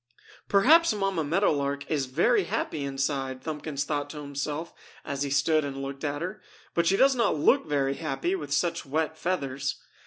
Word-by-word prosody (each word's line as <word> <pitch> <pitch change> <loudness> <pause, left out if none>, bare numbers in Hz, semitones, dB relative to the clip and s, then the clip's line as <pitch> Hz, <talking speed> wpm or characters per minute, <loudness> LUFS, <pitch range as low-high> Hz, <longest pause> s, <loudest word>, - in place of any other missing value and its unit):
"Perhaps 280 +7 +5
Mamma 195 -5 0
Meadow 170 +7 +2
Lark 140 -1 -1
is 140 -4 -1
very 170 - +2
happy 150 - -2
inside!" 135 -1 -2
Thumbkins 150 -2 -3
thought 145 -1 -2
to 150 - -8
himself 145 +3 -4 0.3
as 140 -2 -4
he 140 - 0
stood 150 +3 +2
and 140 -1 -4
looked 135 +1 -6
at 145 +1 -2
her. 185 +3 -5 0.3
"But 170 0 +2
she 195 - +4
does 270 +4 +5
not 230 -9 +2
look 150 - +3
very 140 -2 +1
happy 135 +6 -2
with 150 -7 -4
such 170 +3 0
wet 155 +3 -1
feathers." 140 -6 -2
145 Hz, 180 wpm, -27 LUFS, 140-170 Hz, 0.3 s, Perhaps